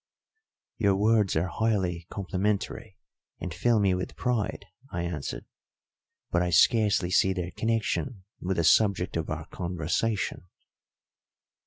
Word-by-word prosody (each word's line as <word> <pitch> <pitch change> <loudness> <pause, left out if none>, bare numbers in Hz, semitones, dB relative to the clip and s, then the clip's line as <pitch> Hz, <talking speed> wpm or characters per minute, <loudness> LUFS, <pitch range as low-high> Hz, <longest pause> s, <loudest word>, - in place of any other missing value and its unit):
"Your 100 -3 +3
words 105 0 +3
are 80 +3 +2
highly 90 -3 -1
complimentary 100 +1 -2 0.4
and - - -5
fill 120 -2 +2
me 100 -2 +3
with 90 0 -3
pride," 120 -4 -1 0.2
I 85 0 -3
answered, 85 -5 -4 0.9
"but 90 - +2
I 90 - +1
scarcely 100 +1 +4
see 95 0 +4
their 90 -1 -4
connection 115 -1 -1 0.2
with 95 +1 -2
the 85 - +2
subject 95 +2 +3
of 80 -1 -2
our 80 0 -4
conversation." 90 +3 -2
95 Hz, 125 wpm, -27 LUFS, 90-105 Hz, 0.9 s, scarcely